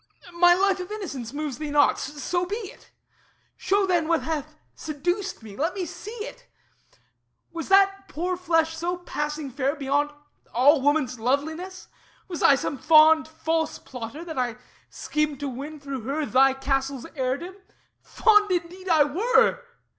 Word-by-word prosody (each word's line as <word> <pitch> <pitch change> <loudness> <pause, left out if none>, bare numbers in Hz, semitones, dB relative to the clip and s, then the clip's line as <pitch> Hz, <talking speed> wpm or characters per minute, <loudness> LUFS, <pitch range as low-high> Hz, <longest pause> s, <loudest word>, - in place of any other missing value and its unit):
My 350 +1 +6
life 390 +1 +2
of 365 +2 -6
innocence 280 - -5
moves 285 -3 -4
thee 305 -1 -4
not; 290 0 +3
so 305 +4 -2
be 405 - -2
it. 430 -4 -9 0.7
Show 400 0 +1
then 350 -4 +1
what 335 -1 +1
hath 305 -1 -4 0.2
seduced 350 - -3
me; 210 -3 -10
let 325 - -1
me 375 -2 -2
see 425 +6 -7
it. - - -12 1.0
Was 335 +1 -6
that 390 0 +4
poor 360 +4 -2
flesh 330 -2 +1
so 345 +2 -2
passing 300 -4 -4
fair, 275 +3 -1
beyond 285 0 0 0.5
All 275 +4 +5
woman's 285 -4 +1
loveliness? 315 +10 -2 0.4
Was 345 -4 -6
I 275 - +6
some 270 0 -3
fond 315 0 +6
False 320 0 -2
plotter, 250 +6 -8
that 320 -5 -5
I 245 -2 -1 0.3
schemed 300 -2 -2
to 285 - -2
win 280 +4 -7
through 275 -3 -6
her 280 +6 -2
Thy 270 0 +4
castle's 270 -1 -2
heirdom? 280 +7 -3 0.5
Fond 420 -2 +3
indeed 365 +1 -3
I 315 -3 +6
were! 410 +11 +2
315 Hz, 155 wpm, -25 LUFS, 280-360 Hz, 1.0 s, My